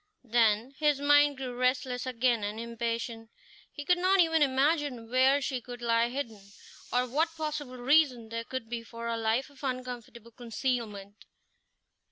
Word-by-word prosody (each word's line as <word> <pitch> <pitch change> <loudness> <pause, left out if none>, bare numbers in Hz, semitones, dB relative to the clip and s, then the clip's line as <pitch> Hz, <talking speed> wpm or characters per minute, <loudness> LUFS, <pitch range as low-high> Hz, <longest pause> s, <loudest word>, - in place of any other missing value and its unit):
Then 230 +1 +2
his 295 -2 +2
mind 290 0 +4
grew 255 -2 -5
restless 250 0 0
again, 245 -3 +1
and 210 +2 -3
impatient; 230 -1 -4 0.4
he 290 - -8
could 360 +3 +3
not 375 +2 +3
even 325 -2 +4
imagine 275 -3 +1
where 260 +2 +4
she 265 -2 -2
could 245 +1 -9
lie 235 0 +2
hidden, 240 -5 -5 0.5
or 250 0 +2
what 320 +6 0
possible 300 -4 -4
reason 250 -3 +3
there 230 0 -4
could 260 -1 -6
be 235 0 -4
for 230 0 -9
a 230 0 -1
life 225 +5 0
of 285 - -18
uncomfortable 250 -3 -5
concealment. 225 -4 -4
250 Hz, 155 wpm, -29 LUFS, 230-280 Hz, 0.5 s, mind